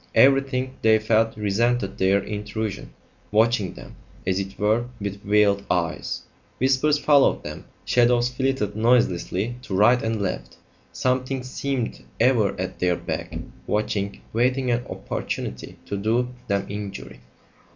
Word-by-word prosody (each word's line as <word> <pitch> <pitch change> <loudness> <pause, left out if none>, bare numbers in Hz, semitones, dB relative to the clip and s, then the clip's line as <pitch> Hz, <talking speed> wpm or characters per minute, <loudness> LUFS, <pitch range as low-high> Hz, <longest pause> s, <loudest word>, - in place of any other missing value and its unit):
Everything, 135 -1 +4
they 110 0 +5
felt, 110 +1 +1
resented 110 +1 0
their 95 +1 +3
intrusion, 105 0 -4 0.4
watching 110 -2 +2
them, - - -11 0.3
as 95 0 +1
it 95 0 -5
were, 110 +3 +2
with 100 -1 -5
veiled 100 -1 +3
eyes; 90 -1 -1 0.3
whispers 135 +3 +3
followed 145 -1 +4
them; - - -7 0.2
shadows 120 0 +3
flitted 125 -5 -1
noiselessly 115 -1 +1
to 115 -7 -4
right 120 +5 +5
and 110 -1 -1
left; 100 -2 -3 0.4
something 130 0 -1
seemed 130 -1 -3 0.2
ever 110 -6 +3
at 95 - -4
their 90 -1 +2
back, - - -5 0.3
watching, 100 -1 -1
waiting 125 +2 +1
an 120 +1 +1
opportunity - - -5
to 100 - -4
do 115 +5 +1 0.2
them 100 -1 0
injury. 100 -10 -7
110 Hz, 130 wpm, -24 LUFS, 100-125 Hz, 0.4 s, they